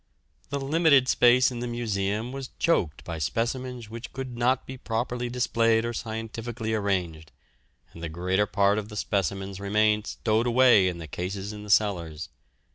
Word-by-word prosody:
The 140 Hz, 0 st, -2 dB
limited 140 Hz, -2 st, +4 dB
space 125 Hz, 0 st, +5 dB
in 120 Hz, -, -5 dB
the 120 Hz, -, -3 dB
Museum 110 Hz, -1 st, -2 dB
was 135 Hz, -1 st, -6 dB
choked 90 Hz, -, +1 dB
by 85 Hz, -1 st, -5 dB
specimens 120 Hz, -, -2 dB
which 115 Hz, +2 st, -8 dB
could 130 Hz, -2 st, -6 dB
not 125 Hz, +2 st, +1 dB
be 130 Hz, -, -7 dB
properly 120 Hz, 0 st, -3 dB
displayed 115 Hz, -2 st, +2 dB
or 120 Hz, -, -2 dB
scientifically 110 Hz, 0 st, -4 dB
arranged, 90 Hz, -7 st, -2 dB, 0.6 s
and 85 Hz, -, -11 dB
the 85 Hz, -, -4 dB
greater 90 Hz, +5 st, 0 dB
part 100 Hz, 0 st, +2 dB
of 105 Hz, 0 st, -7 dB
the 105 Hz, -, -8 dB
specimens 95 Hz, 0 st, -2 dB
remained 105 Hz, +1 st, +1 dB
stowed 110 Hz, +1 st, 0 dB
away 120 Hz, -5 st, +5 dB
in 85 Hz, -2 st, -4 dB
cases 95 Hz, +5 st, -4 dB
in 105 Hz, -, -8 dB
the 105 Hz, -, -10 dB
cellars. 85 Hz, -7 st, +1 dB
110 Hz, 160 wpm, -26 LUFS, 100-120 Hz, 0.6 s, space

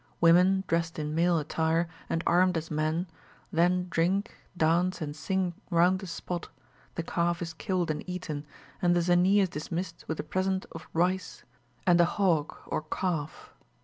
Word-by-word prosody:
Women, 180 Hz, +3 st, +5 dB
dressed 165 Hz, 0 st, 0 dB
in 150 Hz, -1 st, -3 dB
male 170 Hz, +1 st, +3 dB
attire, 160 Hz, +2 st, 0 dB, 0.2 s
and 165 Hz, -, -1 dB
armed 180 Hz, 0 st, +4 dB
as 165 Hz, 0 st, -5 dB
men, 155 Hz, +3 st, 0 dB, 0.5 s
then 180 Hz, +2 st, +3 dB
drink, 190 Hz, +6 st, +1 dB, 0.2 s
dance, 175 Hz, +3 st, +2 dB
and 150 Hz, -3 st, -4 dB
sing 185 Hz, +2 st, -1 dB, 0.2 s
round 180 Hz, +1 st, +4 dB
the 195 Hz, -, -7 dB
spot, 175 Hz, 0 st, -5 dB, 0.5 s
the 165 Hz, -, -2 dB
calf 170 Hz, 0 st, 0 dB
is 165 Hz, -1 st, -4 dB
killed 175 Hz, 0 st, -1 dB
and 150 Hz, -, -4 dB
eaten, 155 Hz, -5 st, -5 dB, 0.3 s
and 175 Hz, -1 st, +3 dB
the 175 Hz, -, +2 dB
Zanee 180 Hz, +3 st, +4 dB
is 190 Hz, -, +1 dB
dismissed 170 Hz, +2 st, -5 dB
with 160 Hz, -, -3 dB
a -, -, -1 dB
present 190 Hz, 0 st, -1 dB
of -, -, -9 dB
rice, 180 Hz, +2 st, 0 dB, 0.4 s
and 175 Hz, -1 st, +5 dB
a -, -, +6 dB
hog 170 Hz, -5 st, +1 dB
or -, -, -2 dB
calf." 160 Hz, -1 st, -3 dB
175 Hz, 165 wpm, -29 LUFS, 165-185 Hz, 0.5 s, a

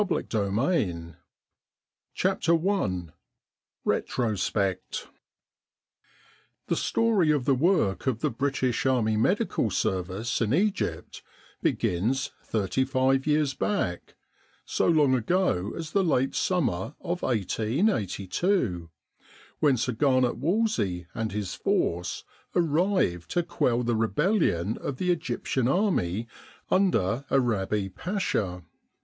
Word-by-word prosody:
M.G. 190 Hz, -, -1 dB
in 100 Hz, +1 st, +1 dB
Egypt 85 Hz, -, -2 dB, 1.0 s
CHAPTER 180 Hz, -2 st, +1 dB
I 95 Hz, -, -1 dB, 0.8 s
RETROSPECT 105 Hz, -5 st, -1 dB, 1.6 s
THE -, -, 0 dB
story 225 Hz, -8 st, +2 dB
of 145 Hz, -5 st, +2 dB
the 140 Hz, -, +4 dB
work 140 Hz, -, +1 dB
of 120 Hz, -4 st, 0 dB
the 150 Hz, -, +1 dB
British 130 Hz, 0 st, 0 dB
Army 115 Hz, -4 st, +2 dB
Medical 180 Hz, -, +1 dB
Service 95 Hz, +5 st, -1 dB
in 115 Hz, +3 st, +2 dB
Egypt 190 Hz, -, -1 dB, 0.4 s
begins 120 Hz, +10 st, 0 dB
thirty 110 Hz, +4 st, 0 dB
five 135 Hz, +1 st, +1 dB
years 150 Hz, -2 st, +2 dB
back 130 Hz, -, -2 dB, 0.5 s
so -, -, 0 dB
long 150 Hz, -6 st, +4 dB
ago 125 Hz, -, +1 dB
as 160 Hz, -2 st, -5 dB
the 200 Hz, +2 st, +2 dB
late 135 Hz, -6 st, +1 dB
summer 140 Hz, -, 0 dB
of 175 Hz, +1 st, -3 dB
1882 110 Hz, -, 0 dB, 0.7 s
when 140 Hz, -4 st, +3 dB
Sir 125 Hz, +2 st, 0 dB
Garnet 130 Hz, 0 st, +2 dB
Wolseley 155 Hz, -, 0 dB
and 115 Hz, -2 st, -3 dB
his 100 Hz, -2 st, -3 dB
force 85 Hz, +1 st, -1 dB, 0.3 s
arrived 165 Hz, -, +1 dB
to 175 Hz, -, +1 dB
quell 125 Hz, -8 st, 0 dB
the 120 Hz, -1 st, 0 dB
rebellion 110 Hz, -, +1 dB
of 135 Hz, -, -4 dB
the 180 Hz, +4 st, +1 dB
Egyptian 130 Hz, -5 st, -1 dB
Army 120 Hz, -, +1 dB, 0.4 s
under 135 Hz, -, +2 dB
Arabi 105 Hz, -6 st, +1 dB
Pasha. 95 Hz, -, -2 dB
130 Hz, 105 wpm, -27 LUFS, 100-170 Hz, 1.6 s, the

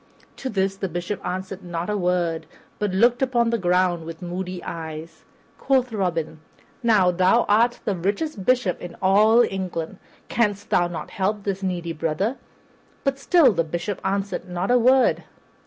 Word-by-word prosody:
To 265 Hz, -, -4 dB
this 195 Hz, -2 st, 0 dB
the 195 Hz, -1 st, -3 dB
Bishop 175 Hz, +4 st, -4 dB
answered 185 Hz, +1 st, -5 dB
not 175 Hz, -1 st, -4 dB
a 210 Hz, -, -1 dB
word 175 Hz, -3 st, 0 dB, 0.3 s
but 210 Hz, -, 0 dB
looked 235 Hz, +7 st, +3 dB
upon 240 Hz, -3 st, +2 dB
the 235 Hz, -, 0 dB
ground 180 Hz, -2 st, +2 dB
with 165 Hz, 0 st, -8 dB
moody 180 Hz, +1 st, -5 dB
eyes. 160 Hz, 0 st, -7 dB, 0.3 s
Quoth 260 Hz, -3 st, +1 dB
Robin, 170 Hz, -6 st, -2 dB, 0.4 s
"Now, 210 Hz, -7 st, +4 dB
thou 185 Hz, +6 st, +3 dB
art 235 Hz, +4 st, +3 dB
the 205 Hz, -, 0 dB
richest 200 Hz, -, -2 dB
bishop 245 Hz, -5 st, +1 dB
in 175 Hz, -1 st, -8 dB
all 215 Hz, +5 st, +5 dB
England; 185 Hz, -2 st, -4 dB, 0.3 s
canst 205 Hz, -3 st, -1 dB
thou 175 Hz, -, +3 dB
not 175 Hz, -1 st, -7 dB
help 200 Hz, +2 st, -1 dB
this 195 Hz, -1 st, -2 dB
needy 175 Hz, -3 st, -2 dB
brother?" 165 Hz, -, -1 dB, 0.7 s
But 275 Hz, 0 st, 0 dB
still 285 Hz, -, +5 dB
the 165 Hz, -2 st, +1 dB
Bishop 170 Hz, +5 st, -4 dB
answered 195 Hz, -1 st, -2 dB
not 180 Hz, +4 st, -1 dB
a 250 Hz, -, +5 dB
word. 255 Hz, +2 st, +4 dB
190 Hz, 160 wpm, -23 LUFS, 175-220 Hz, 0.7 s, all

